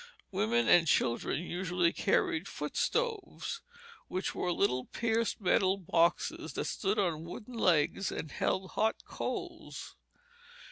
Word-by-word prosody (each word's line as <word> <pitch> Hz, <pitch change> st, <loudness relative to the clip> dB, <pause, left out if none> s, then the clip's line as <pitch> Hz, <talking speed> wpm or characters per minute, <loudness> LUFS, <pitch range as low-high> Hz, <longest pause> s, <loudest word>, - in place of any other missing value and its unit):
Women 115 Hz, +2 st, +2 dB
and 170 Hz, -1 st, +6 dB
children 130 Hz, +3 st, +1 dB
usually 180 Hz, -1 st, 0 dB
carried 160 Hz, +5 st, +1 dB
foot 150 Hz, 0 st, -5 dB
stoves, 460 Hz, -1 st, -1 dB, 0.5 s
which 185 Hz, -, -2 dB
were 180 Hz, -, -1 dB
little 130 Hz, -9 st, +1 dB
pierced 230 Hz, -1 st, 0 dB
metal 190 Hz, 0 st, +3 dB
boxes 170 Hz, -2 st, +1 dB
that -, -, -2 dB
stood 200 Hz, +1 st, -1 dB
on 170 Hz, -6 st, 0 dB
wooden 210 Hz, +8 st, -8 dB
legs, 180 Hz, -2 st, +2 dB
and 150 Hz, -, -5 dB
held 190 Hz, 0 st, -1 dB
hot 220 Hz, +1 st, 0 dB
coals. -, -, -5 dB
180 Hz, 125 wpm, -32 LUFS, 160-205 Hz, 0.5 s, and